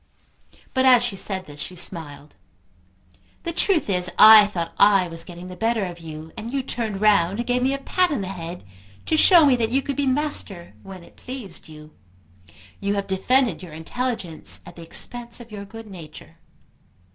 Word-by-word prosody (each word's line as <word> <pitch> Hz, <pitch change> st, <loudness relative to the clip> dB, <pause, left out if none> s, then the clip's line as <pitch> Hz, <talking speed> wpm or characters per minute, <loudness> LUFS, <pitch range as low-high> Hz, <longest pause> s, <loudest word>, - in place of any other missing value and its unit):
But 260 Hz, -, +2 dB
as 250 Hz, -2 st, +6 dB
she 240 Hz, -5 st, -2 dB
said 190 Hz, -1 st, -3 dB
this 145 Hz, 0 st, -12 dB
she 180 Hz, -, -5 dB
smiled. 155 Hz, -5 st, -4 dB, 1.1 s
"The 335 Hz, -, -3 dB
truth 345 Hz, -1 st, +1 dB
is, 180 Hz, -3 st, 0 dB
I 215 Hz, -1 st, +9 dB
thought 170 Hz, -5 st, -5 dB
I 200 Hz, -3 st, +5 dB
was 165 Hz, -1 st, -7 dB
getting 175 Hz, +1 st, -10 dB
the 180 Hz, -, -9 dB
better 225 Hz, +1 st, 0 dB
of 175 Hz, -1 st, -8 dB
you, 160 Hz, -1 st, -9 dB
and 225 Hz, +2 st, -7 dB
you 275 Hz, -1 st, -2 dB
turned 220 Hz, -6 st, -4 dB
round 200 Hz, -3 st, +3 dB
and 240 Hz, -, -3 dB
gave 245 Hz, +1 st, 0 dB
me 260 Hz, +2 st, +2 dB
a -, -, -4 dB
pat 360 Hz, +6 st, +1 dB
on 285 Hz, -9 st, -2 dB
the 190 Hz, -, -4 dB
head 175 Hz, -2 st, -7 dB, 0.4 s
to 320 Hz, -, +1 dB
show 335 Hz, 0 st, +7 dB
me 275 Hz, -3 st, +5 dB
that 225 Hz, -2 st, 0 dB
you 265 Hz, +3 st, 0 dB
could 280 Hz, -, -4 dB
be 280 Hz, 0 st, -1 dB
master 255 Hz, -, -1 dB
when 190 Hz, -2 st, -11 dB
it -, -, -19 dB
pleased 245 Hz, -10 st, -9 dB
you. 155 Hz, -1 st, -14 dB, 0.9 s
You 200 Hz, +1 st, -1 dB
have 200 Hz, -1 st, -2 dB
defended 200 Hz, +2 st, +1 dB
your 175 Hz, -4 st, -11 dB
intelligence 180 Hz, 0 st, -3 dB
at 175 Hz, -, -12 dB
the 170 Hz, -, -11 dB
expense 235 Hz, +8 st, -2 dB
of 235 Hz, -2 st, -13 dB
your 200 Hz, -1 st, -7 dB
good 225 Hz, +3 st, -11 dB
nature." 165 Hz, -4 st, -12 dB
200 Hz, 190 wpm, -23 LUFS, 175-245 Hz, 1.1 s, I